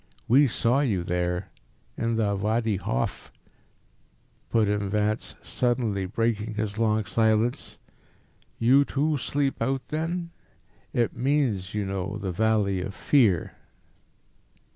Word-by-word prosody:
"We 140 +4 +6
saw 120 +2 +1
you 105 -11 0
there 90 +1 -2 0.4
in 115 0 -1
the 105 -3 +1
Wadi 110 +1 0
Hof," 65 -9 -3 1.2
put 110 -2 +2
in 105 -1 -1
Vance, 105 +1 -1
suddenly 115 -6 0
breaking 110 +1 -1
his 105 0 -3
long 110 -2 +2
silence; 110 +2 +1 0.8
"you 130 +5 +5
too 145 +2 0
sleep 140 0 -1
out, 130 +3 -1
then? 170 +2 -2 0.6
It 120 -2 0
means, 125 -9 0
you 105 -1 -1
know, 95 +1 -3
the 95 -3 -3
Valley 100 -1 +1
of 100 +2 -5
Fear." 110 - +2
110 Hz, 120 wpm, -26 LUFS, 100-125 Hz, 1.2 s, We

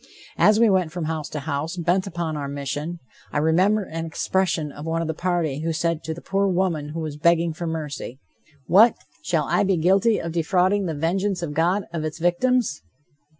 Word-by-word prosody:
As 210 +1 +5
we 230 - +6
went 185 -5 +2
from 175 -1 -4
house 155 -1 -3
to 150 - -5
house, 155 +4 -3
bent 180 +3 +1
upon 170 -3 -3
our 145 -2 -3
mission, 145 +4 -4 0.3
I - - -2
remember 185 +8 +3
an 165 -2 -5
expression 165 -1 -1
of 145 - -9
one 165 +1 -1
of - - -4
the 160 - -1
party 165 -4 -1
who 165 +1 -1
said 165 0 -1
to 160 - -2
the 170 - -11
poor 195 +1 +1
woman 175 -5 0
who 165 - -3
was 155 -2 -5
begging 170 +1 +3
for 170 +2 -5
mercy: 150 -5 -5 0.5
"What! 220 +6 +6 0.3
shall - - +1
I - - +2
be 190 -2 +2
guilty 195 +7 +3
of 165 - -4
defrauding 185 +4 +1
the 160 - -3
vengeance 180 +4 -1
of 150 -3 -3
God 175 +6 +1
of 165 -2 -2
its 155 -1 -4
victims?" 175 +3 +1
170 Hz, 200 wpm, -23 LUFS, 155-185 Hz, 0.5 s, we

